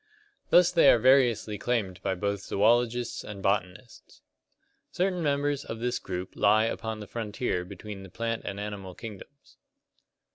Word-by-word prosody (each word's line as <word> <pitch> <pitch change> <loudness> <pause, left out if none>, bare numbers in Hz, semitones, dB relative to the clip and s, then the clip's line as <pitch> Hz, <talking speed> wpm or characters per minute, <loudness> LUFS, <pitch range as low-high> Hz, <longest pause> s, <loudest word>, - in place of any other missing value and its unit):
Thus 175 0 +6
they 170 -2 +6
are - - +7
variously 120 -4 +3
claimed 100 -6 -1
by 95 - -1
both 100 +1 -2
zoologists 120 +4 +1
and 100 -2 -8
botanists. 100 +3 -3 0.7
Certain 180 -1 -1
members 145 -1 0
of 115 - -6
this 120 +2 -2
group 90 0 -6
lie 110 +1 +4
upon 110 -1 -4
the - - -6
frontier 110 -4 -3
between 100 +2 -9
the 95 - -11
plant 115 +4 -3
and 100 - -5
animal 100 -3 -6
kingdoms. 115 +6 -11
110 Hz, 145 wpm, -28 LUFS, 100-125 Hz, 0.7 s, are